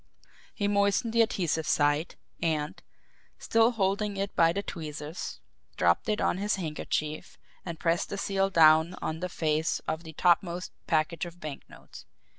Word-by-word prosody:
He 205 - 0
moistened 200 +3 +2
the 230 - +5
adhesive 170 -7 0
side, 145 +3 +1 0.3
and, 155 -2 -1 0.6
still 225 0 +3
holding 200 -1 0
it 195 +1 -3
by 165 0 +5
the 200 +4 -3
tweezers, 155 -1 -6 0.4
dropped 85 - +2
it 215 - +1
on 185 - +1
his 205 +2 +1
handkerchief 155 -3 -3 0.3
and 170 -3 -6
pressed 170 0 0
the 200 - -4
seal 195 0 0
down 160 0 +5
on 160 0 -3
the 180 +1 -3
face 155 -2 0
of 160 +1 -2
the 160 -1 -10
topmost 175 +1 +1 0.2
package 165 +1 0
of 175 +1 -12
banknotes. 155 -4 -10
170 Hz, 150 wpm, -28 LUFS, 155-195 Hz, 0.6 s, the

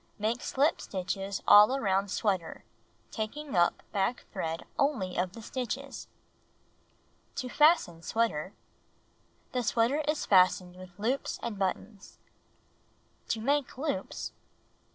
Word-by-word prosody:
Make 220 +3 -1
slip 290 +5 +1
stitches 195 +1 -4
all 210 +5 +8
around 195 -5 +1
sweater 190 -4 -1 0.5
taking 260 +5 -4
up 175 -1 +2
back 200 +4 -1
thread 165 -4 -3
only 235 -11 +1
of 180 +1 -1
the 230 - -10
stitches. 265 +3 -5 1.3
To 255 - -3
Fasten 295 - +4
Sweater 200 -4 -1 1.0
The 250 - 0
sweater 235 +5 +2
is 300 0 0
fastened 185 -1 +4
with 185 -1 -13
loops 245 +6 -1
and 225 -4 -4
buttons. 195 +2 -4 1.1
To 225 - -1
Make 280 +1 0
Loops 275 -2 -3
1. - - -37
215 Hz, 115 wpm, -30 LUFS, 185-260 Hz, 1.3 s, all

